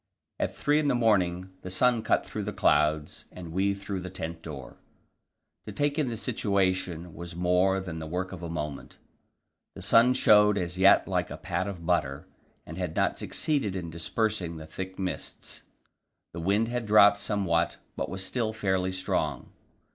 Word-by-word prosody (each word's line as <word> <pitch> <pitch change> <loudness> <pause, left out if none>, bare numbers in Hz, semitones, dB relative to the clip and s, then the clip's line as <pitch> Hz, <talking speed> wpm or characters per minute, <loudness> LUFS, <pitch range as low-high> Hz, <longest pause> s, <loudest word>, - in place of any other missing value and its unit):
At - - -1
three 150 +1 +2
in 150 - 0
the 135 - +2
morning 95 -6 +1
the 95 - -7
sun 120 +5 +2
cut - - +1
through - - -5
the - - -2
clouds 75 0 +1
and 85 -3 -9
we 100 +3 +1
through 100 -1 -5
the 90 +1 -6
tent 80 -2 -6
door. 75 -5 -9 0.9
To - - -4
take 145 +1 0
in 140 -5 +1
the 115 - -4
situation 95 -7 -1
was 85 +1 -8
more 90 +2 +2
than 90 -4 -6
the 80 - -6
work 90 +3 -3
of 95 -3 -8
a 85 - -5
moment. 75 -3 -5 0.8
The - - -7
sun 125 +3 +5
showed 105 -4 +5
as 90 -1 -3
yet 95 +1 +6
like - - -1
a - - -6
pat 90 +2 -2
of 90 -5 -6
butter, 70 -3 0 0.4
and 80 +4 -8
had 90 -3 -3
not - - +1
succeeded 140 - -1
in 85 -3 -4
dispersing 90 0 -2
the 80 - -8
thick 95 +4 -7
mists; 95 -1 -5 0.7
the 85 - -6
wind 100 +6 +2
had 120 -1 -3
dropped 105 -1 +6
somewhat, 95 -6 0 0.2
but - - -3
was 95 +1 -4
still 115 -3 -1
fairly 95 -3 0
strong. 95 0 -2
95 Hz, 180 wpm, -28 LUFS, 85-105 Hz, 0.9 s, yet